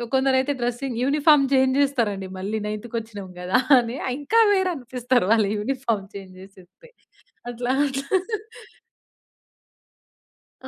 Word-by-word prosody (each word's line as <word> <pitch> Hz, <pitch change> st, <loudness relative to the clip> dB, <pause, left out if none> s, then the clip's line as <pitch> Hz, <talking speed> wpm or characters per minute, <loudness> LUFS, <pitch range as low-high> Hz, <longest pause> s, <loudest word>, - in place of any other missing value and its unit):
కొందరైతే 265 Hz, +1 st, +2 dB
dressing 245 Hz, +1 st, -3 dB
uniform 290 Hz, 0 st, +4 dB
change 265 Hz, 0 st, +3 dB
జేస్తారండి 215 Hz, -9 st, -1 dB
మళ్ళీ 210 Hz, +3 st, -3 dB
నైన్త్ 215 Hz, +2 st, -5 dB
కొచ్చినాం 210 Hz, -4 st, -7 dB
గదా! 180 Hz, +5 st, +2 dB, 0.2 s
అని. 235 Hz, +2 st, -4 dB, 0.2 s
ఇంకా 445 Hz, +11 st, +3 dB
వేరు 380 Hz, -2 st, +1 dB
అనిపిస్తారు 250 Hz, -3 st, -1 dB
వాళ్ళ 220 Hz, -3 st, +3 dB
యూనిఫార్మ్ 230 Hz, -3 st, -2 dB
చేంజ్ 190 Hz, -2 st, -9 dB
జేసేస్తే 190 Hz, -, -17 dB, 0.6 s
అట్లా 245 Hz, +1 st, -3 dB
అట్లా. 275 Hz, -1 st, -2 dB, 2.6 s
ఆ! -, -, -10 dB
245 Hz, 110 wpm, -23 LUFS, 210-275 Hz, 2.6 s, యూనిఫార్మ్